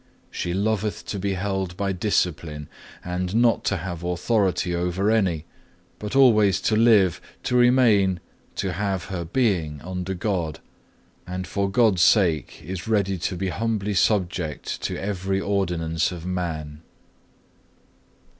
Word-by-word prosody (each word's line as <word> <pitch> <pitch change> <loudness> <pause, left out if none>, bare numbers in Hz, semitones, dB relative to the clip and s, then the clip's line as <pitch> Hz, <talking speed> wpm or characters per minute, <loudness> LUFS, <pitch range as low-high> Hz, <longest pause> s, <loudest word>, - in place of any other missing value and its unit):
She 90 - -3
loveth 105 +1 -1
to 100 - -4
be 100 +1 -1
held 95 -2 -2
by 100 0 -1
discipline, 85 -6 -1 0.4
and 90 +2 -2
not 115 -2 +3
to 105 - +1
have 85 0 -5
authority 90 0 0
over 90 +4 0
any, 90 -8 +1 0.5
but 105 +4 -5
always 110 -8 +5
to 110 - +1
live, 110 -6 +4 0.2
to 125 - -1
remain, 120 -7 +4 0.4
to 95 -2 -2
have 95 -1 -2
her 85 -2 -2
being 85 - 0
under 90 +1 -4
God, 90 -6 -2 0.7
and 90 +1 -4
for 100 0 -1
God's 100 -3 +3
sake 85 -6 +3
is 95 +3 -6
ready 100 -4 +1
to 90 - -2
be 95 +1 -2
humbly 105 0 -1
subject 90 -5 0
to - - -3
every 95 -1 -2
ordinance 85 -5 0
of 85 -2 -7
man. 80 -5 -4
95 Hz, 135 wpm, -24 LUFS, 90-105 Hz, 0.7 s, always